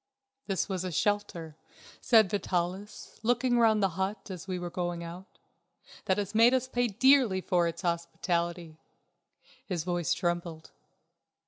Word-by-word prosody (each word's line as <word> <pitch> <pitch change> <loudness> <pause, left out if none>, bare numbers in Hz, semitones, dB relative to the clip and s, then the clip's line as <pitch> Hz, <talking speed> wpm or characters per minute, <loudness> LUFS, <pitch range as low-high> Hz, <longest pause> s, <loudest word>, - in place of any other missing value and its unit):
"This 195 -3 -1
was 190 -3 -3
a 185 - -3
shelter," 170 -4 -1 0.5
said 220 -6 +5
Vitalis, 185 +1 -3
looking 245 +2 +2
round 220 -3 +4
the 195 - +3
hut 195 +1 -3
as 185 0 -8
we 185 -1 -2
were 175 -1 -5
going 175 -1 -3
out, 175 +3 -10 0.7
"that 190 - +1
has 205 0 -3
made 230 +3 +6
us 260 0 0
pay 245 -1 0
dearly 250 -2 +4
for 180 -2 +1
its 170 +3 -5
hospitality." 170 -1 -2 0.8
His 175 -5 -3
voice 175 -1 0
trembled. 175 -2 -3
185 Hz, 140 wpm, -29 LUFS, 175-210 Hz, 0.8 s, made